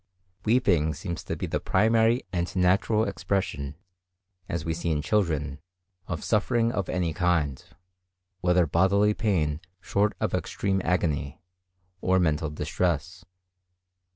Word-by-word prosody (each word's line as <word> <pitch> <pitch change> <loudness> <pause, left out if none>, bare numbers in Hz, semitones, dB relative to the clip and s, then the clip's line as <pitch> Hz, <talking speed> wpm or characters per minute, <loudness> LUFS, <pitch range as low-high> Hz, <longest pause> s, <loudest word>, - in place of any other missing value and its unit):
Weeping 90 -10 +3
seems 85 +2 -5
to - - -3
be - - -3
the - - -1
primary 115 +4 +3
and 85 0 -2
natural 95 +4 +3
expression, 95 -8 -2 0.7
as 85 -2 -3
we 80 - 0
see 85 +1 -3
in 75 -2 0
children, 75 -9 0 0.5
of 85 -4 -4
suffering 115 +2 +2
of 100 -5 -2
any 85 -3 0
kind, 80 -6 0 0.8
whether 90 -1 +3
bodily 95 +6 +3
pain 80 -10 0 0.2
short 100 +3 +1
of - - -1
extreme 95 -1 -1
agony, 80 -6 -1 0.6
or 95 0 +3
mental 80 -3 +1
distress. 90 +3 -2
90 Hz, 125 wpm, -27 LUFS, 80-100 Hz, 0.8 s, Weeping